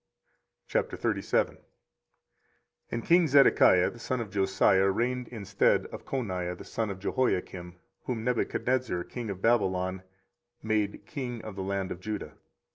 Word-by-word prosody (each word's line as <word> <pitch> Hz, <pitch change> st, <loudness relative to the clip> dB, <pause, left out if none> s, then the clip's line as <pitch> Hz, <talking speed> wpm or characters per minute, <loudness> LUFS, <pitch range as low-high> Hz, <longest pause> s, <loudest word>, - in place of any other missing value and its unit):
24:037:001 -, -, 0 dB, 1.3 s
And 120 Hz, -1 st, -4 dB
king 170 Hz, 0 st, +5 dB
Zedekiah 135 Hz, -10 st, +5 dB
the 120 Hz, -, -13 dB
son 130 Hz, +2 st, -2 dB
of 110 Hz, -4 st, -5 dB
Josiah 95 Hz, 0 st, +3 dB
reigned 125 Hz, +4 st, -1 dB
instead 100 Hz, -4 st, +1 dB
of -, -, -8 dB
Coniah 90 Hz, -9 st, -3 dB
the -, -, -9 dB
son 110 Hz, -2 st, -3 dB
of 100 Hz, -, -4 dB
Jehoiakim, 90 Hz, -4 st, -1 dB, 0.3 s
whom 115 Hz, -3 st, -3 dB
Nebuchadrezzar 125 Hz, -4 st, 0 dB
king 120 Hz, +2 st, -6 dB
of 95 Hz, -1 st, -6 dB
Babylon 95 Hz, -5 st, +1 dB, 0.6 s
made 105 Hz, -2 st, -1 dB
king 120 Hz, -1 st, -5 dB
in 110 Hz, -, -6 dB
the 95 Hz, -, -5 dB
land 95 Hz, 0 st, -2 dB
of 90 Hz, -, -5 dB
Judah. 105 Hz, +3 st, -5 dB
105 Hz, 130 wpm, -29 LUFS, 95-120 Hz, 1.3 s, king